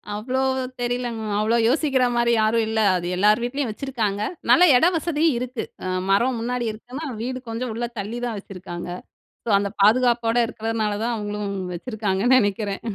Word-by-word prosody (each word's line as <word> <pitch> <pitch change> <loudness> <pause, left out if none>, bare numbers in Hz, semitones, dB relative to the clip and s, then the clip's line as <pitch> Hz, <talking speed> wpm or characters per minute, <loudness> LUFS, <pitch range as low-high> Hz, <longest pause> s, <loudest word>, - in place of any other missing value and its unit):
அவ்வளோ 250 +5 -2 0.4
தெரியலங்க 245 -1 -2
மேம். 205 -1 -2
அவ்வளோ 220 +2 +2
யோசிக்கிற 270 -1 +2
மாரி 235 0 +2
யாரும் 220 +1 +2
இல்ல. 220 0 -1 0.2
அது 175 -1 -2
எல்லார் 210 +5 +3
வீட்டிலயும் 250 0 -2
வச்சுருக்காங்க. 215 -4 -2 0.3
நல்லா 360 - +7
இட 250 - +5
வசதியும் 320 -2 +1
இருக்கு. 250 -1 -4 0.2
அ - - -2 0.2
மரம் 235 +5 +2
முன்னாடி 245 +1 -2
இருக்குன்னா, 250 +8 -8 0.2
வீடு 255 +2 -4
கொஞ்சம் 230 +2 -3
உள்ள 240 +1 -2
தள்ளி 215 +4 -4
தான் 230 -3 -3
வச்சுருக்காங்க. 180 -3 -8 0.6
சோ - - -1
அந்த 200 0 -1
பாதுகாப்போடு 235 +2 +3
இருக்கிறதுனால 225 -2 -2
தான் 240 0 0
அவங்களும் 210 -1 -4 0.3
வச்சுருக்காங்கன்னு 220 +3 +1
நெனைக்கிறேன். 205 -2 -1
230 Hz, 160 wpm, -23 LUFS, 210-250 Hz, 0.6 s, நல்லா